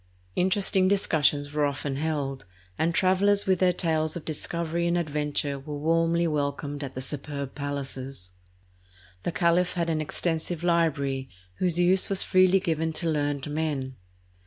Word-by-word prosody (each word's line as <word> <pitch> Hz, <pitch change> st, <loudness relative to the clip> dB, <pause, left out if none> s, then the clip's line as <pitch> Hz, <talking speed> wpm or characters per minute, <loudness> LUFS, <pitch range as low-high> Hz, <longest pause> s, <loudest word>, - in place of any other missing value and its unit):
Interesting 190 Hz, 0 st, +2 dB
discussions 150 Hz, -7 st, +2 dB
were 150 Hz, 0 st, +1 dB
often 140 Hz, -1 st, -3 dB
held, 140 Hz, -5 st, -2 dB, 0.3 s
and 160 Hz, -, +1 dB
travelers 200 Hz, +2 st, +3 dB
with 190 Hz, -2 st, +2 dB
their 185 Hz, -1 st, +4 dB
tales 160 Hz, -3 st, 0 dB
of 170 Hz, -, -6 dB
discovery 170 Hz, +2 st, -2 dB
and 170 Hz, 0 st, +1 dB
adventure 150 Hz, -3 st, -1 dB
were 145 Hz, +2 st, -6 dB
warmly 165 Hz, +2 st, +2 dB
welcomed 145 Hz, -1 st, -2 dB
at 135 Hz, -1 st, -7 dB
the 130 Hz, -, -4 dB
superb 140 Hz, 0 st, -4 dB
palaces. 135 Hz, -7 st, -5 dB, 0.9 s
The 175 Hz, -, -2 dB
caliph 175 Hz, +1 st, +2 dB
had 170 Hz, -1 st, -1 dB
an 155 Hz, -1 st, 0 dB
extensive 165 Hz, +2 st, -2 dB
library, 140 Hz, -6 st, +1 dB, 0.3 s
whose 175 Hz, -2 st, 0 dB
use 180 Hz, +2 st, +4 dB
was 195 Hz, -1 st, +2 dB
freely 185 Hz, +1 st, +4 dB
given 160 Hz, -3 st, -1 dB
to 170 Hz, -, -3 dB
learned 145 Hz, -3 st, -1 dB
men. 145 Hz, -4 st, -2 dB
160 Hz, 145 wpm, -27 LUFS, 145-175 Hz, 0.9 s, their